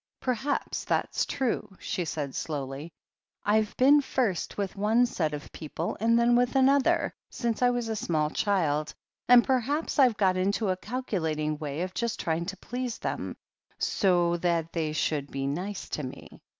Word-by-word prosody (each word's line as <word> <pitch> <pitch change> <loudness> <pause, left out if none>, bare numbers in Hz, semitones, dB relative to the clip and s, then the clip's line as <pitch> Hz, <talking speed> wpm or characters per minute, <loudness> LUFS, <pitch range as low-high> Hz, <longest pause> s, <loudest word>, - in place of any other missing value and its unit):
"Perhaps 260 +3 -2
that's - - 0
true," 235 -7 -2
she 180 - -2
said 145 -3 -3
slowly. 145 +1 -4 0.5
"I've 215 0 +2
been 285 +3 +6
first 240 -9 -1
with 200 -2 -2
one 220 +5 +3
set 165 -10 -1
of 150 -1 -7
people, 160 +2 -4
and 230 +2 +3
then 235 +1 +4
with 245 +2 +2
another, 270 +1 +3 0.2
since 235 -1 -2
I 250 - +5
was 245 -1 -1
a 220 - -2
small 155 -6 0
child, 155 -7 0 0.3
and 245 -1 +8
perhaps 275 +6 0
Fve 255 -6 +5
got 185 -2 +3
into 200 +3 +1
a 185 - +2
calculating 160 - -2
way 150 0 -4
of 185 0 -5
just 235 -2 -2
trying 165 +1 -1
to 195 - -5
please 245 +3 -4
them, - - -4 0.4
so 175 -3 +2
that 170 -2 0
they 160 -3 -1
should 150 -2 -1
be 135 0 -3
nice 180 +8 -3
to - - -3
me. 130 -3 -9
195 Hz, 165 wpm, -28 LUFS, 160-240 Hz, 0.5 s, and